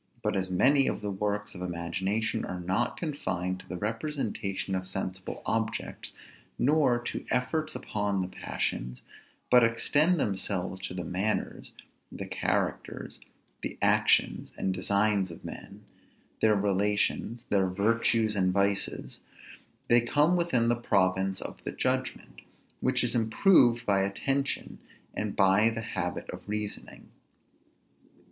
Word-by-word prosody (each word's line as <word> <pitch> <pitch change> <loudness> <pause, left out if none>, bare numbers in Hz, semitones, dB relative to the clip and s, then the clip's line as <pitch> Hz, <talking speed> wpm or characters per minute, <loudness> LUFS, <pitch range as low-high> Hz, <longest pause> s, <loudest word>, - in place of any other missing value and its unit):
But - - 0
as 95 -1 -1
many 135 +9 +4
of - - -1
the 105 -1 -3
works 105 +1 -2
of 90 - -9
imagination 95 +6 -2
are 90 - -4
not 95 +7 -1
confined 95 - -3
to - - -14
the 90 - -5
representation 105 - -3
of 95 0 -2
sensible 95 -1 -5
objects, 110 0 -2 0.5
nor 140 -3 +3
to - - -4
efforts 155 +5 -1
upon 100 -2 -1
the - - -3
passions, 60 -8 -3 0.5
but 125 -1 +7
extend 145 +9 +3
themselves 95 -3 -1
to - - -7
the 90 - -3
manners, 95 +6 -2 0.4
the - - -6
characters, - - -2 0.4
the - - -5
actions, - - +3
and 95 - 0
designs 100 +1 +2
of 85 - -11
men, - - -9 0.6
their 110 -1 +5
relations, 105 +4 0
their 95 -2 +3
virtues 110 +3 +2
and 95 -2 +2
vices, 100 +1 0 0.7
they 120 0 +5
come 150 +8 +3
within 150 -10 +2
the 120 - +3
province 95 -4 +1
of - - -7
the - - -3
judgment, - - -2 0.4
which 130 -1 +1
is 120 - 0
improved 120 - +4
by 100 -1 +3
attention, 135 +8 -1 0.3
and 105 -1 -3
by 100 +3 +5
the 115 0 -4
habit 95 -6 -3
of - - -10
reasoning. 105 -1 -5
105 Hz, 130 wpm, -29 LUFS, 95-120 Hz, 0.7 s, but